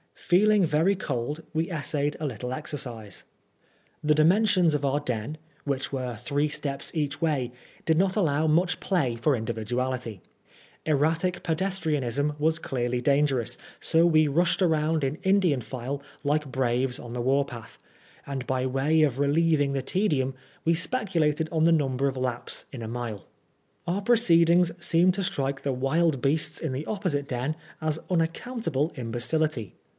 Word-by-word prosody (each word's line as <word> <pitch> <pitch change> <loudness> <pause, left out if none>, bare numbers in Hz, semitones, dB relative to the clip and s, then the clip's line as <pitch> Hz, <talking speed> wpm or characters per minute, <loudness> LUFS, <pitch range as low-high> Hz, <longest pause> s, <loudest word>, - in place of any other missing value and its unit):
Feeling 205 +2 +3
very 165 +6 +2
cold, 145 -2 -3
we 160 +1 0
essayed 150 -2 -1
a 155 - -3
little 125 -1 -4
exercise. 120 -8 -4 0.8
The 150 0 +3
dimensions 180 +1 +4
of 145 -1 0
our 140 +1 +1
den, 125 +2 -3 0.3
which 135 -2 -2
were 130 -3 -3
three 145 +6 -1
steps 145 +1 -4
each 150 0 -2
way, 140 -7 0 0.3
did 160 -1 +3
not 190 +1 +2
allow 160 -6 +2
much 175 +3 +2
play 135 - 0
for 140 +4 +2
individuality. 115 -1 -3 0.6
Erratic 160 +4 +1
pedestrianism 155 -6 0
was 160 +2 +1
clearly 125 -2 -2
dangerous, 140 -3 +2 0.2
so 165 +1 +4
we 155 -2 +4
rushed 170 +6 +2
round 160 -3 +2
in 135 +3 -1
Indian 190 -7 +3
file, 130 +3 -5 0.2
like 150 0 0
braves 125 0 0
on 120 - -9
the 125 - -2
war 135 +3 +3
path; 120 -5 -10 0.5
and, 135 -3 -5
by 130 -1 0
way 135 +5 +2
of 140 -4 +2
relieving 145 0 +2
the 135 - 0
tedium, 145 -7 0 0.3
we 165 - +3
specu 190 +1 0
lated 155 +1 +1
on 160 -1 +2
the 170 - +5
number 135 -3 +1
of 135 - -2
laps 125 -2 -3
in 130 - -7
a 115 - -5
mile. 115 -4 -5 0.6
Our 180 +4 -1
proceedings 175 -6 +4
seemed 175 +2 +4
to 195 - -1
strike 135 -5 -2
the 140 - -1
wild 135 +2 +1
beasts 150 +4 +1
in 160 - -3
the 135 +4 -4
opposite 180 -10 -2
den 130 +5 -2 0.3
as 155 0 -1
unaccountable 165 - -1
imbecility. 125 - -1
150 Hz, 155 wpm, -27 LUFS, 130-165 Hz, 0.8 s, the